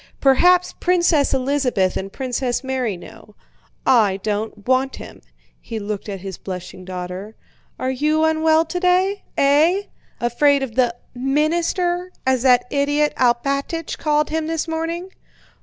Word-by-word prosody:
Perhaps 355 +7 +4
Princess 345 -5 +2
Elizabeth 255 -8 +1
and 195 +1 -4
Princess 255 0 -2
Mary 255 -7 -2
know. 205 +4 -14 0.5
I 215 -7 +4
don't 210 -1 -3
want 260 +1 +2
him." - - -11 0.4
(He 225 - -6
looked 210 0 -5
at 195 -2 -5
his 190 -1 -7
blushing 185 0 -7
daughter.) 185 +3 -6 0.4
"Are 260 - -1
you 305 +4 +1
unwell 320 0 +3
today? 360 +4 +1 0.2
Eh? 310 +8 +4 0.4
Afraid 275 +4 +2
of 250 -4 -5
the 240 -1 +2 0.2
'minister' 335 +7 0
as 260 -2 +2
that 250 -1 +4
idiot 290 +1 +1
Alpátych 275 +6 0
called 300 -1 +1
him 320 0 -1
this 325 0 -2
morning?" 330 +3 -3
270 Hz, 130 wpm, -21 LUFS, 235-320 Hz, 0.5 s, Perhaps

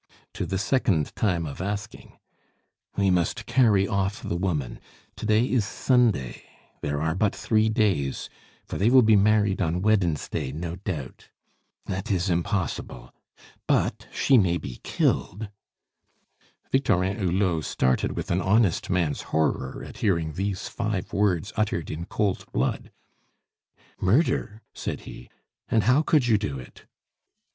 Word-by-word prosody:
"To - - -3
the 95 - -1
second 100 - +1
time 90 -6 0
of 70 +2 -6
asking." 105 +2 -5 0.8
"We 100 -2 +2
must 90 -2 0
carry 105 -7 +3
off 100 +1 -1
the - - -2
woman. 85 -9 -2 0.4
To - - -4
day 110 +2 +4
is 125 -4 +2
Sunday 110 - +1 0.4
there 75 0 -2
are 80 +1 0
but 100 +3 +1
three 110 0 +2
days, 100 - 0 0.4
for - - -5
they 105 +4 +4
will 130 0 +7
be 110 -1 +5
married 105 -1 +3
on 90 +1 0
Wednesday, 90 -10 0
no 85 +4 -5
doubt; 85 -9 -6 0.6
it 95 0 -4
is 95 -2 +1
impossible. 85 0 -2 0.5
But - - +1
she 130 -3 +4
may 85 -4 +2
be 65 -7 -8
killed 105 +3 -1 0.7
" - - -38
Victorin 100 -8 +2
Hulot 90 -3 +1
started 65 0 0
with - - -4
an 90 +2 +1
honest 100 0 +2
man's 85 -6 0
horror 80 0 -1
at - - -11
hearing 85 -7 0
these 95 +2 -3
five - - -3
words 100 -1 +1
uttered 105 -7 -1
in 80 +2 -5
cold 100 0 -2
blood. 65 +3 -1 1.1
"Murder?" 110 - +1
said - - -4
he. - - -11 0.4
"And 110 - +3
how 125 +8 +4
could 155 -4 +3
you 110 -3 +4
do 70 -10 -3
it?" 65 -1 -13
95 Hz, 140 wpm, -25 LUFS, 85-110 Hz, 1.1 s, will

